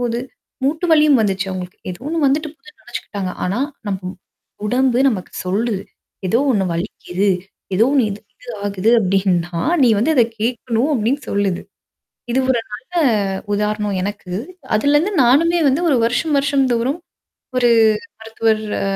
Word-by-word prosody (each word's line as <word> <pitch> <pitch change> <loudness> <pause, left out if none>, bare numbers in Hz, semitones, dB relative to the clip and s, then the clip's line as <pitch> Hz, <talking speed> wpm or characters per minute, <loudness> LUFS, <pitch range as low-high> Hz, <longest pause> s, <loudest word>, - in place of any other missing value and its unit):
போது. 235 -1 -1 0.5
மூட்டு 315 +5 0
வலியும் 300 -3 +5
வந்துச்சு 195 -2 0
அவங்களுக்கு. 185 -1 -6
ஏதோ 175 - -8
ஒண்ணு 330 +1 -1
வந்துட்டு 305 +3 +1
போகுதுன்னு 300 0 -19
நெனச்சுக்கிட்டாங்க. 200 -5 -5
ஆனா, 185 +5 -1 0.3
நம்பும் 190 -1 -4 0.5
உடம்பு 250 +2 +2
நமக்கு 200 -8 -3
சொல்லுது. 200 +2 -1 0.5
எதோ 230 +6 +3
ஒண்ணு 200 -3 +1
வலிக்குது. 180 +2 -2 0.5
ஏதோ 220 - +5
ஒண்ணு 270 -4 +4
இது 200 +1 -6 0.2
இது 250 - -15 0.2
ஆகுது 200 +1 +1
அப்டின்னா, 180 -3 0 0.2
நீ 250 - +6
வந்து 235 +10 +2
அத 250 - +6 0.2
கேட்கணும் 235 +3 0
அப்டின்னு 250 +4 0
சொல்லுது. 200 -3 0 0.7
இது 255 - +2
ஒரு 250 -2 +3
நல்ல 260 +11 -10 0.6
உதாரணம் 210 -1 -1
எனக்கு. 200 -1 -5 0.4
அதுலருந்து 295 - +2
நானுமே 330 +8 +4
வந்து 275 +6 +1
1 275 - +4
வருஷம் 290 +6 0
வருஷம் 275 -1 +2
தோறும், 250 +7 0 0.6
ஒரு 245 -1 +4 0.5
மருத்துவர் 225 -1 0 0.2
அ - - -1
230 Hz, 140 wpm, -19 LUFS, 195-270 Hz, 0.7 s, நீ